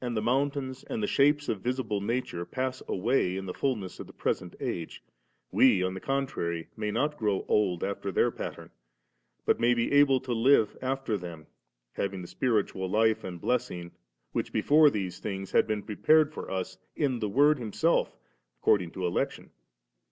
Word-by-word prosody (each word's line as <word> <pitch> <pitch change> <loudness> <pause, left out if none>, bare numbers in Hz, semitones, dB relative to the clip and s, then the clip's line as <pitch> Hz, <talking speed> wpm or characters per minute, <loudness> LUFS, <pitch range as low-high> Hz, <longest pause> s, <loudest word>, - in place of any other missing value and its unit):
the 120 -3 -2
mountains 130 +2 -1
and 230 -4 -3
the - - +3
shapes 145 -4 +3
of 100 - -2
visible 120 -4 -1
nature 110 -5 -2
pass 130 +6 -3
away 95 -2 +1
in 95 - -5
the 90 - -4
fulness 110 -8 -2
of - - -7
the - - -14
present - - -2
age, 85 -2 -4 0.5
we 100 -8 +5
on 95 0 -1
the 95 - -5
contrary 130 -13 -2
may 105 -1 -3
not 150 +7 -1
grow 105 -3 0
old 95 -5 +1
after 100 0 -3
their - - +2
pattern, - - -7 0.7
but - - +2
may 120 +1 +4
be 115 0 0
able 140 -2 +5
to 125 -1 -3
live 115 -2 +4
after 130 -5 -1
them, 85 -3 -8 0.5
having 95 -2 -3
the - - -8
spiritual 105 -7 0
life 110 +2 +2
and 90 -2 -6
blessing 115 -9 -2 0.4
which - - -2
before 150 +1 +5
these 95 -7 -4
things 95 -2 -5
have - - +4
been 105 -2 -2
prepared 150 +10 +3
for - - -7
us 95 0 -4 0.2
in 135 -6 0
the 105 -2 -1
Word 145 +6 +4
Himself 125 +9 0 0.4
according 90 -5 +3
to 95 - -3
election. 85 - -2
110 Hz, 175 wpm, -29 LUFS, 95-135 Hz, 0.7 s, we